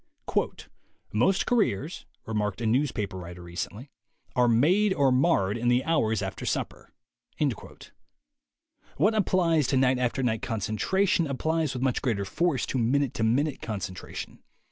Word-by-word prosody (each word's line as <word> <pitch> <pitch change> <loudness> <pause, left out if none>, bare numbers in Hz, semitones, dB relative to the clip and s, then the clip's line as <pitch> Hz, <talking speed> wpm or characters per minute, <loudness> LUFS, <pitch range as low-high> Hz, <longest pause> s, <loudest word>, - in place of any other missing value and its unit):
"Most 155 - +2
careers," 180 - 0 0.2
remarked 105 -2 -2
a 120 - -3
newspaper 110 -5 0
writer 90 0 -9
recently, 100 +9 -6 0.4
"are 125 -1 +4
made 180 - +3
or 140 -2 +3
marred 125 - +2
in 120 - -1
the 120 +1 +3
hours 115 -10 +1
after - - -5
supper." - - -3 2.1
.What 210 +3 +3
applies 170 - +2
to 135 - +1
night 130 -1 +3
after 125 +2 0
night 110 -3 0
concentration 165 - 0
applies 155 +1 -1
with 125 - -3
much 130 -2 +1
greater 105 -6 -1
force 155 - 0
to 130 - -2
minute 130 +3 +1
to 110 - -2
minute 135 +6 +1
concentration. 95 -5 -6
125 Hz, 135 wpm, -27 LUFS, 110-155 Hz, 2.1 s, are